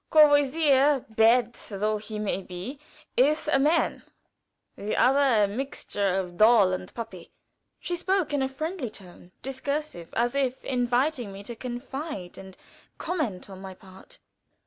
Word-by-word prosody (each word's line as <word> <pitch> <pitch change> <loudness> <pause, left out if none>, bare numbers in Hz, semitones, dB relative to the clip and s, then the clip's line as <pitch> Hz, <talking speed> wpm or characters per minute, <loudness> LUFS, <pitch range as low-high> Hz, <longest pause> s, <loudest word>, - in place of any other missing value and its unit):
Courvoisier, 290 -2 +5
bad 230 +2 +4 0.2
though 215 +1 -1
he 210 0 -7
may 210 -2 -2
be, 190 +10 -7 0.4
is 300 +5 +3
a 285 -3 +3
man; 305 +5 +2 0.7
the 205 +1 -3
other 260 -4 +4
a - - +3
mixture 205 -4 -2
of 180 -2 -3
doll 215 -3 +6
and 185 0 -5
puppy." 190 -7 -8 0.5
She 355 - -3
spoke 370 -2 0
in 285 - +1
a 265 - 0
friendly 310 0 -4
tone; 180 -3 -14
discursive, 270 - -4
as 240 +1 +1
if 265 -2 -1
inviting 245 -2 0
confidence 240 - -6
and 190 -1 -11 0.4
comment 305 - -3
on 190 -1 -10
my 190 -1 -8
part. 190 0 -15
245 Hz, 135 wpm, -27 LUFS, 200-285 Hz, 0.7 s, doll